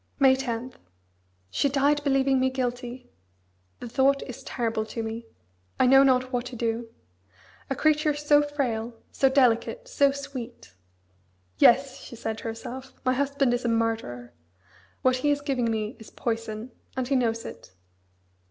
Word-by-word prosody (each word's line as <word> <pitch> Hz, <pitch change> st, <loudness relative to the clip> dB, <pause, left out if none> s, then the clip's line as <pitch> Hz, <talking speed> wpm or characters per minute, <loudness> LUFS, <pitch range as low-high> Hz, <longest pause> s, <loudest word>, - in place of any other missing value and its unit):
May 265 Hz, -1 st, +6 dB
10. 250 Hz, -1 st, -4 dB, 0.8 s
She 280 Hz, -, +1 dB
died 285 Hz, +2 st, +2 dB
believing 270 Hz, -1 st, +3 dB
me 260 Hz, 0 st, +2 dB
guilty! 250 Hz, -1 st, -4 dB, 0.7 s
The -, -, -7 dB
thought 270 Hz, +3 st, +2 dB
is 250 Hz, -, -8 dB
terrible 225 Hz, -3 st, -2 dB
to 225 Hz, +1 st, -4 dB
me. 225 Hz, +1 st, -5 dB, 0.5 s
I -, -, +5 dB
know 270 Hz, +2 st, +7 dB
not 255 Hz, -1 st, +3 dB
what 245 Hz, 0 st, -1 dB
to 250 Hz, -, -8 dB
do. 230 Hz, 0 st, -2 dB, 0.8 s
A 270 Hz, -, -1 dB
creature 305 Hz, 0 st, +2 dB
so 295 Hz, 0 st, +4 dB
frail, 245 Hz, -6 st, -2 dB, 0.2 s
so 270 Hz, -, +3 dB
delicate, 265 Hz, -, +2 dB
so 285 Hz, -, +3 dB
sweet. 270 Hz, -, -8 dB, 0.9 s
"Yes!" 270 Hz, +2 st, +5 dB
she 240 Hz, -, -10 dB
said 220 Hz, -1 st, -4 dB
to -, -, -12 dB
herself, 245 Hz, +3 st, -6 dB
"my 255 Hz, -, +3 dB
husband 275 Hz, -1 st, +1 dB
is 245 Hz, -, -1 dB
a -, -, 0 dB
murderer; 225 Hz, -, -2 dB, 0.7 s
what 255 Hz, 0 st, +3 dB
he 290 Hz, +3 st, 0 dB
is 290 Hz, 0 st, +2 dB
giving 260 Hz, -5 st, 0 dB
me 220 Hz, +2 st, -2 dB
is 220 Hz, -, -12 dB
poison, 225 Hz, 0 st, -4 dB, 0.3 s
and 255 Hz, -1 st, -1 dB
he 275 Hz, -, +1 dB
knows 230 Hz, -3 st, 0 dB
it." -, -, -10 dB
255 Hz, 155 wpm, -26 LUFS, 230-275 Hz, 0.9 s, know